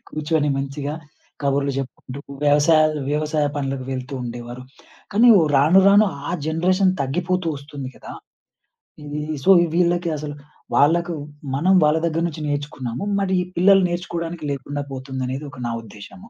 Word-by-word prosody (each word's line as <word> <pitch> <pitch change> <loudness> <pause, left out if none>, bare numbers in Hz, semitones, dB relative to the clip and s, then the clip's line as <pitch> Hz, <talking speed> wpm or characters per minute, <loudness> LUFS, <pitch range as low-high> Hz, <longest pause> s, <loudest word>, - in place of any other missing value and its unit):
కూర్చొని, 155 -1 -1
మంచిగా 140 +2 -4 0.5
కబుర్లు 140 0 +1
జెప్పుకుంటూ, 135 0 -6 0.2
వ్యవసాయ, 150 +2 +5 0.3
వ్యవసాయ 150 0 0
పనులకు 135 -2 -3
వెళ్తూండేవారు. 125 -2 -6 0.5
కానీ, 235 +4 +5
ఒ - - +3
రాను 160 +8 +6
రాను 205 +2 +6 0.2
ఆ - - -2 0.2
జనరేషన్ 185 +4 +2
తగ్గిపోతూ 175 +5 -1
ఒస్తుంది 140 -2 -8
గదా! - - -10 0.9
హ్మ్. 150 +1 -4
సో, 195 - +1 0.3
వీళ్ళకి 175 -1 +2
అసలు, 145 0 -6 0.4
వాళ్ళకు 170 +4 +3 0.4
మనం 180 +7 +3
వాళ్ళ 150 +1 +3
దగ్గర 165 0 -1
నుంచి 155 -1 -7
నేర్చుకున్నాము. 145 -1 -4 0.2
మరి 195 -1 0
ఈ - - -1
పిల్లలు 195 +2 +6
నేర్చుకోవడానికి 170 -2 -4
లేకుండా 145 +1 -4
పోతుందనేది, 130 +1 -4
ఒక 125 - -12
నా - - -2
ఉద్దేశము. 185 - -13
150 Hz, 135 wpm, -21 LUFS, 135-170 Hz, 0.9 s, రాను